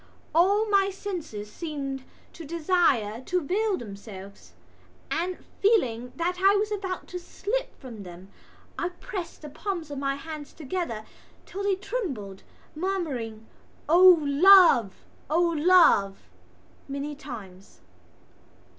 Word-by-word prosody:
All 395 +6 +4
my 395 -1 +3
senses 335 - -6
seemed 275 -3 -5 0.3
to 335 - -10
desire 305 - +1
to 360 - +1
veil 390 +5 0
themselves 200 -2 -10 0.6
and, 360 +2 -1 0.2
feeling 250 - +2
that 355 +4 -2
I 390 +2 +5
was 420 +1 0
about 380 -3 -3
to 360 - -5
slip 415 +7 -4
from 235 -5 -9
them, 180 +1 -11 0.5
I 350 - -1
pressed 355 -2 -7
the 300 - -7
palms 340 -1 -5
of 280 - -4
my 275 0 -1
hands 300 0 -8
together 305 -8 -4 0.4
until 390 - -7
they 400 -1 +1
trembled, 280 - -5 0.3
murmuring: 295 - -3 0.4
"O 360 +2 +8
love! 285 - +6 0.2
O 315 +3 +2
love!" 335 - +4 0.7
many 280 +2 -4
times. 215 -10 -11
320 Hz, 120 wpm, -26 LUFS, 240-370 Hz, 0.7 s, O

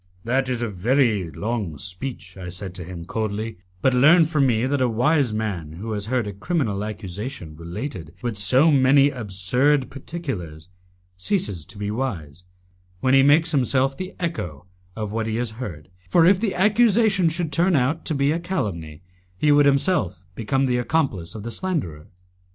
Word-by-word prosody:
"That 130 +3 0
is 120 -2 -1
a - - 0
very 105 - +1
long 100 -1 -3
speech," 90 - -6
I 95 -2 -7
said 90 +1 -6
to 90 -1 -7
him, 85 -1 -8
coldly, 110 0 -3 0.2
"but 130 - +4
learn 155 +7 +6
from 150 -4 +2
me 115 -1 +1
that 140 +1 0
a 125 - +3
wise 135 +3 +2
man 100 -8 -3
who 105 +7 -6
has 105 -1 -3
heard 125 -1 0
a 105 - -5
criminal 105 - -1
accusation 105 - -6
related 85 - -6
with 120 -2 -2
so 130 +10 +4
many 140 +1 +5
absurd 125 +5 +1
particulars 105 - -6 0.5
ceases 100 - -2
to 95 +2 -12
be 105 0 -3
wise 90 - -4 0.5
when 130 +6 +2
he 135 - +7
makes 155 +4 +4
himself 135 -1 +2
the 185 +4 -7
echo 90 - -4 0.3
of 105 -2 -4
what 110 0 -2
he 110 - -2
has 120 -1 -2
heard, 85 -8 -7 0.2
for 170 -2 +5
if 185 +1 +5
the 210 -3 -1
accusation 210 -2 +3
should 160 -1 -2
turn 175 +4 +2
out 140 +4 +1
to 155 - -1
be 140 +1 +2
a 165 - 0
calumny, 90 - -4 0.3
he 150 +9 +3
would 145 0 +5
himself 140 - +1
become 135 +6 0
the 125 -1 +1
accomplice 120 - -1
of 105 - -7
the 115 - -5
slanderer." 110 - -3
120 Hz, 175 wpm, -23 LUFS, 95-145 Hz, 0.5 s, he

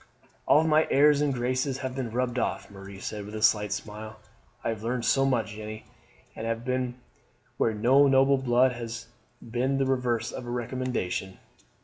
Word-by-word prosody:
"All 155 - +6
my 155 0 +3
airs 145 +1 +5
and 145 -1 +2
graces 130 +2 -1
have 130 0 -4
been 130 -3 -3
rubbed 125 +1 -1
off," - - -2
Marie 95 0 -10
said 105 +1 -5
with 105 +2 -8
a 110 - -4
slight 105 -2 +3
smile. 110 +1 -6 0.4
"I - - -1
have 110 -2 -3
learned 120 +1 -2
so 135 0 +3
much, 115 -5 0
Jeanne, 110 +1 -7 0.5
and 110 - -5
have 115 +1 -3
been 125 -1 -1 0.6
where 110 - +1
noble 135 +4 +5
blood 130 0 +3
has 115 -1 -6 0.4
been 125 +4 0
the 135 - +1
reverse 125 -3 0
of 125 - -7
a - - -5
recommendation. 120 -6 -3
120 Hz, 170 wpm, -27 LUFS, 110-130 Hz, 0.6 s, All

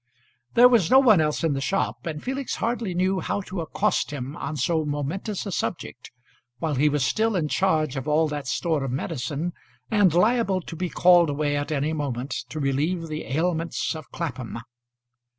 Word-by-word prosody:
There 245 +1 +9
was 230 -9 +3
no 260 - +7
one 225 -10 +6
else 150 +1 0
in 160 -3 +2
the 135 - -2
shop, 195 +2 -1
and 150 -2 -5
Felix 270 0 -3
hardly 230 -5 -2
knew 185 +1 +1
how 200 - -2
to 185 -2 -5
accost 160 - 0
him 140 0 -5
on 155 -3 -4
so 160 +4 +1
momentous 155 +9 -3
a 200 - -4
subject, 175 - -4 0.5
while 160 0 -2
he 145 +3 +3
was 145 -3 +1
still 220 +8 +1
in 165 -4 0
charge 155 -5 +1
of 135 +1 -4
all 155 +1 +3
that 145 -2 -4
store 155 +3 0
of 135 - -2
medicine, 145 +4 -3 0.4
and 205 -5 +4
liable 195 +1 +2
to 165 - -8
be 180 +2 -3
called 175 -2 +5
away 145 0 0
at 145 +1 -2
any 150 +1 0
moment 135 -3 -3 0.2
to 155 - -5
relieve 155 +5 -1
the 155 0 -4
ailments 165 +3 -1
of 155 -2 -9
Clapham. 130 -9 -5
160 Hz, 185 wpm, -25 LUFS, 145-185 Hz, 0.5 s, There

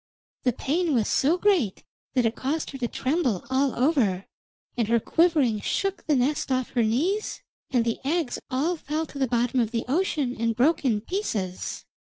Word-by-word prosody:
The 250 - +1
pain 310 +5 0
was 220 -4 +2
so 310 +6 +2
great 360 - +1 0.3
that 250 -2 +3
it 225 - +1
caused 295 +4 -2
her 270 - -8
to 240 - 0
tremble 260 - -1
all 265 0 +2
over, 240 - +2 0.5
and 235 -3 0
her 235 +1 +3
quivering 295 -6 +2
shook 390 - -2
the 300 - +3
nest 285 +3 0
off 255 -1 0
her 245 - +1
knees, 310 - 0 0.3
and 245 -3 +2
the 230 - -1
eggs 305 -1 -1
all 310 +7 0
fell 305 +2 -2
to 285 - -9
the 265 - +2
bottom 245 +2 +1
of 230 -3 +2
the 230 0 -2
ocean 290 -4 0
and 230 0 0
broke 300 +8 +3
in 225 -6 +1
pieces. 215 - -3
260 Hz, 185 wpm, -26 LUFS, 235-315 Hz, 0.5 s, that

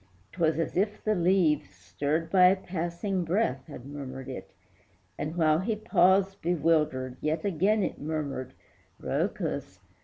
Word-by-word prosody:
'Twas 165 -3 +1
as 165 - -2
if 205 +3 0
the 215 - +2
leaves, 170 - +2
Stirred 140 - -3
by 185 -2 +7
a 185 - +5
passing 180 +1 -3
breath, 165 - 0
had 125 - -10
murmured 135 -2 -7
it, - - -7 0.7
And, 150 +3 -4
while 155 -2 +3
he 215 +4 -1
paused 195 -2 +3
bewildered, 150 -6 +1
yet 155 +3 -1
again 200 +3 +2
It - - -3
murmured 145 -4 -3 0.5
"Rhœcus!" - - -2
165 Hz, 140 wpm, -28 LUFS, 145-190 Hz, 0.7 s, by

